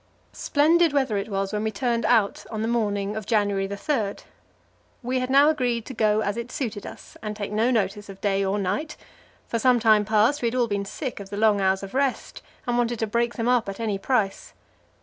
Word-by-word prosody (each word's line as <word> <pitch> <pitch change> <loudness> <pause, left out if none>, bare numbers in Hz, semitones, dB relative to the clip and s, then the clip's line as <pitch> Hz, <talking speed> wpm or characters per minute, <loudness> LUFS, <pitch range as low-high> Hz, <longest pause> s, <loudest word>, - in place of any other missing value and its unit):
Splendid 320 +2 +3
weather 265 -6 +1
it 200 +2 -2
was 195 0 -2
when 210 - -1
we 220 - 0
turned 235 +2 -1
out 220 -5 +2
on 220 -1 -3
the - - -1
morning 205 -3 -1
of 215 -2 -5
January 205 -3 +1
3. 200 +1 -2 0.9
We 255 +2 0
had 255 0 -2
now 280 +3 +6
agreed 245 -6 -1
to 265 - -7
go 215 -2 +2
as 205 +2 -2
it 235 +1 -5
suited 225 -7 -4
us, - - -12
and 210 -1 -4
take 205 -1 -5
no 220 +3 +2
notice 205 -3 -1
of 195 -1 -10
day 195 -1 +1
or 195 +1 0
night; 205 +11 -2 0.5
for 230 - -1
some 250 +1 +4
time 215 -2 +4
past 220 +7 +2
we 235 - +1
had 230 - -2
all 245 -2 +2
been 200 -2 -2
sick 255 +4 -5
of 200 -1 -9
the 200 - -6
long 210 -2 +3
hours 190 0 +1
of 195 - -8
rest, 270 0 -1 0.2
and 245 -1 0
wanted 240 0 0
to 225 - -1
break 235 +2 -1
them 230 0 -2
up 245 -4 +2
at 195 - -7
any 215 -4 -2
price. 215 -3 -1
220 Hz, 225 wpm, -24 LUFS, 200-245 Hz, 0.9 s, now